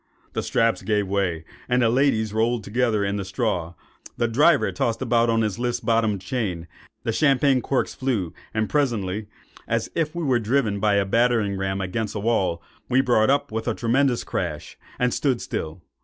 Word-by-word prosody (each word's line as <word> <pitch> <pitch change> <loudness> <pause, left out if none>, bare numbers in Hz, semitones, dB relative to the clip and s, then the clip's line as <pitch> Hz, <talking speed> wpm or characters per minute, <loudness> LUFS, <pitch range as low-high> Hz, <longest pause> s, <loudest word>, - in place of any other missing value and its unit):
The - - -1
straps 115 -2 +1
gave 105 -2 0
way, 95 -5 -1 0.2
the 125 -1 +3
ladies 115 -4 +2
rolled 115 +1 +1
together 110 -1 0
in 100 +1 -1
the 100 - -3
straw, 95 -4 -2 0.4
the 120 - +1
driver 120 - +3
tossed 115 +5 -1
about 120 -1 +2
on 115 0 +2
his 105 -2 -2
list 120 -1 -2
bottomed 110 -4 +1
chain, 95 -7 -3 0.4
the - - 0
champagne 135 0 +3
corks 135 +2 -1
flew,—and 110 - -3
presently, 110 -8 -1 0.4
as - - -1
if 160 -1 -1
we 170 - -2
were 130 -5 +2
driven 110 -2 0
by 105 0 +2
a 100 -1 +2
battering 115 -1 +2
ram 95 0 -2
against 105 +4 -3
a - - -2
wall, 95 -6 0 0.3
we 130 +1 +3
brought 120 -4 +3
up 140 -1 +1
with 110 +2 -3
a 115 - 0
tremendous 125 +1 +1
crash, 75 -5 -4 0.2
and 125 -1 +1
stood 130 -5 +1
still. 80 -3 -5
115 Hz, 175 wpm, -24 LUFS, 100-125 Hz, 0.4 s, the